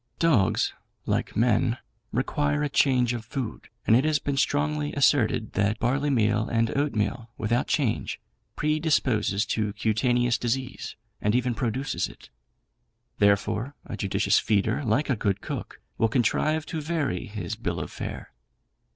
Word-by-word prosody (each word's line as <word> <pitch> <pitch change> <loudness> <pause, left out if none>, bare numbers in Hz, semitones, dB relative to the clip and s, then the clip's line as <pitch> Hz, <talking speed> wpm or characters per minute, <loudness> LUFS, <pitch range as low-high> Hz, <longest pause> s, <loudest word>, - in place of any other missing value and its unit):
Dogs, 140 - +3 0.3
like - - -1
men, 115 +1 +2 0.3
require 145 +4 0
a 145 - 0
change 125 -3 +3
of 120 -2 -4
food, 120 -1 -5 0.2
and 110 - +5
it 125 - +4
has 155 -1 +3
been 140 -1 -2
strongly 145 +2 0
asserted 130 -6 +2
that 105 +1 +1
barleymeal 115 -4 +1
and 115 -1 +1
oatmeal, 120 -5 -1
without 115 +3 0
change, 130 -8 0 0.4
predisposes 140 -9 +1
to 105 -1 -1
cutaneous 120 +2 +1
disease, 125 +2 -3 0.3
and 105 +2 +2
even 125 0 +1
produces 130 +3 -1
it; - - -15 0.9
therefore, 105 +6 +2
a 115 - -5
judicious 100 -2 +2
feeder, 110 +5 +1
like 130 +5 +1
a 130 - +2
good 100 -2 0
cook, - - -6 0.2
will 115 - +3
contrive 155 +6 +1
to 160 -3 -4
vary 150 - -2
his 105 +2 -5
bill 115 - -3
of - - -5
fare. - - -6
120 Hz, 140 wpm, -26 LUFS, 110-145 Hz, 0.9 s, and